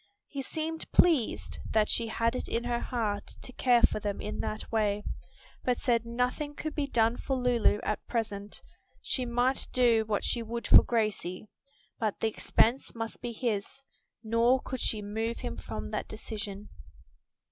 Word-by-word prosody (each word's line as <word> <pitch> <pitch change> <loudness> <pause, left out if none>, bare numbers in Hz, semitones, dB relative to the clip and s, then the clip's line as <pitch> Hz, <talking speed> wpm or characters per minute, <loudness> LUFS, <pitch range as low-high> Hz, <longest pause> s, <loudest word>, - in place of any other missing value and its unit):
He 280 - -4
seemed 320 +3 -4
pleased 315 -10 +3
that 215 -1 +4
she 230 - +1
had 230 +2 0
it - - -3
in 235 - -1
her 240 0 0
heart 215 -5 -2
to 255 - -7
care 245 -2 +4
for - - +4
them 205 -1 -3
in 210 - -4
that 215 - -4
way, 210 -2 +1 0.6
but 250 -1 +1
said 235 -2 +1
nothing 250 +5 -1
could 310 +1 -4
be 290 -2 -1
done 230 -2 +2
for 270 - -2
Lulu 245 -4 +3
at 215 - -2
present, 210 -3 -3 0.4
she 255 -2 +1
might 245 +3 +1
do 235 -3 +4
what 210 -2 0
she 235 - 0
would 235 +1 -4
for - - +9
Gracie, 215 -4 -1 0.5
but 215 -4 -1
the 225 - +2
expense 230 +3 +1
must 225 0 -5
be 240 - -3
his; 235 +2 -3 0.4
nor 230 +3 +3
could 260 - -4
she 210 -2 -1
move 225 +3 -2
him 80 - -4
from 80 -3 -6
that - - -2
decision. 210 -2 -6
230 Hz, 170 wpm, -30 LUFS, 215-250 Hz, 0.6 s, for